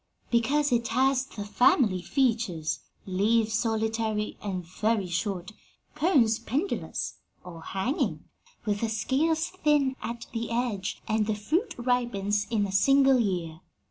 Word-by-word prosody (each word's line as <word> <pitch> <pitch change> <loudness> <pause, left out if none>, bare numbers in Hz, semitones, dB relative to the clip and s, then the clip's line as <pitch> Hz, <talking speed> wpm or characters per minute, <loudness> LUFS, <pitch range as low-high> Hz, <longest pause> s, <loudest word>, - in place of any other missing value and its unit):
"Because 280 +5 +2
it 235 -1 +2
has 265 +2 +2
the 205 -5 -7
family 210 -3 +3
features 220 - 0 0.3
leaves 215 +4 +1
solitary 220 -1 -1
and 185 -4 -4
very 210 +3 0
short; 180 +2 -3 0.4
cones 275 -9 +3
pendulous, 280 - -3 0.2
or 170 -2 -10
hanging, 195 - -2 0.4
with 205 -1 -1
the 230 - 0
scales 295 +9 +1
thin 295 -7 +1
at 235 0 -5
the 230 0 -3
edge; 230 -5 -2
and 215 -1 +1
the 215 - 0
fruit 330 - -1
ripens 235 -5 0
in 215 -3 +1
a 195 - -4
single 270 +6 +5
year. 175 -6 -2
225 Hz, 130 wpm, -27 LUFS, 205-260 Hz, 0.4 s, single